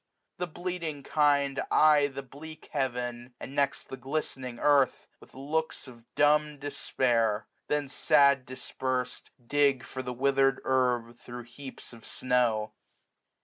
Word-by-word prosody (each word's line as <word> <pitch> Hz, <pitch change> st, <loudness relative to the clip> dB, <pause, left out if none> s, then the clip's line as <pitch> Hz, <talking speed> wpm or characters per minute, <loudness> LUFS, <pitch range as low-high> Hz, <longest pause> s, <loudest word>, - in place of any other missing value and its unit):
The 180 Hz, -, -1 dB
bleating 170 Hz, -4 st, -5 dB
kind 145 Hz, -2 st, +2 dB
Eye 150 Hz, -2 st, +5 dB
the 135 Hz, -1 st, -7 dB
bleak 155 Hz, +4 st, -12 dB
heaven, 125 Hz, -3 st, -3 dB
and 135 Hz, -, -8 dB
next 140 Hz, -1 st, 0 dB
the 135 Hz, -, -7 dB
glistening 130 Hz, -2 st, -4 dB
earth. 140 Hz, -1 st, +3 dB
With -, -, -18 dB
looks 150 Hz, +3 st, -3 dB
of 120 Hz, -2 st, -14 dB
dumb 150 Hz, 0 st, +3 dB
despair; 120 Hz, -6 st, 0 dB, 0.2 s
then, 150 Hz, -1 st, 0 dB
sad 140 Hz, 0 st, +4 dB
dispersed. 130 Hz, 0 st, -4 dB, 0.2 s
Dig 140 Hz, -1 st, +2 dB
for 130 Hz, -, -6 dB
the 125 Hz, -1 st, -5 dB
withered 135 Hz, +1 st, +2 dB
herb 125 Hz, -2 st, +1 dB
thro* 120 Hz, 0 st, -8 dB
heaps 125 Hz, +2 st, -11 dB
of 115 Hz, -, -14 dB
snow. 115 Hz, -4 st, 0 dB
135 Hz, 130 wpm, -29 LUFS, 125-145 Hz, 0.2 s, Eye